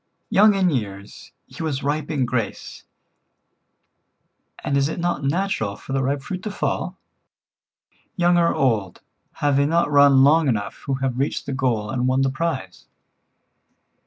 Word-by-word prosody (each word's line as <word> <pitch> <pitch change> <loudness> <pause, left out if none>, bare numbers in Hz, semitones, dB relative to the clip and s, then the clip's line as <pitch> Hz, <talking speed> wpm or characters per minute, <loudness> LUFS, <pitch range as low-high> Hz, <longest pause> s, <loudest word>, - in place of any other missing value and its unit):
Young 210 +1 +5
in 185 -2 +2
years, 100 -6 -5
he - - -11
was 150 -4 -2
ripe 145 +1 -2
in 140 -5 0
grace, 120 -2 -4 1.8
and 140 - -1
is 140 +1 +2
it 160 - -5
not 170 -5 -1
natural 140 - -1
for 135 - -8
the 135 - +1
ripe 135 +1 -1
fruit 185 +4 -5
to 215 - -4
fall? 205 - -3 1.2
Young 175 -1 +3
or 170 -1 +3
old, 110 -9 0 0.3
have 145 -2 0
they 140 0 +3
not 165 -1 +1
run 140 -2 +6
long 155 +2 +4
enough 105 -5 -2
who 135 - 0
have 130 -2 -2
reached 140 - -2
the - - -4
goal 120 -6 -1
and 125 -1 -1
won 130 +1 +2
the 135 - +1
prize? 135 - -4
140 Hz, 160 wpm, -22 LUFS, 130-160 Hz, 1.8 s, run